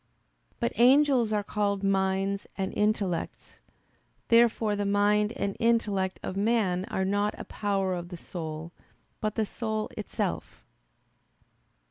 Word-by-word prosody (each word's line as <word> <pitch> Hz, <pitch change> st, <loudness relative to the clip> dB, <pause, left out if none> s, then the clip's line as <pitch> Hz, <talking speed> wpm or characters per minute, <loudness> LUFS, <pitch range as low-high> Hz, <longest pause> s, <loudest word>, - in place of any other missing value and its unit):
But 115 Hz, -, 0 dB
angels 255 Hz, -1 st, +5 dB
are 210 Hz, -1 st, +1 dB
called 200 Hz, -1 st, -1 dB
"minds" 195 Hz, 0 st, 0 dB
and 190 Hz, -1 st, -2 dB
"intellects." 210 Hz, -5 st, -1 dB, 0.7 s
Therefore 230 Hz, -2 st, +4 dB
the 205 Hz, -, -1 dB
mind 205 Hz, +1 st, +2 dB
and 200 Hz, -6 st, -2 dB
intellect 210 Hz, -5 st, +1 dB
of 185 Hz, -, -4 dB
man 200 Hz, -3 st, +1 dB
are 200 Hz, -4 st, -2 dB
not 205 Hz, +2 st, 0 dB
a -, -, -4 dB
power 195 Hz, -2 st, -1 dB
of 175 Hz, -1 st, -5 dB
the 175 Hz, -, -7 dB
soul, 160 Hz, -1 st, -6 dB, 0.5 s
but 215 Hz, -1 st, -2 dB
the 220 Hz, -, +1 dB
soul 220 Hz, 0 st, -3 dB
itself. 210 Hz, -2 st, -4 dB
205 Hz, 125 wpm, -28 LUFS, 190-215 Hz, 0.7 s, angels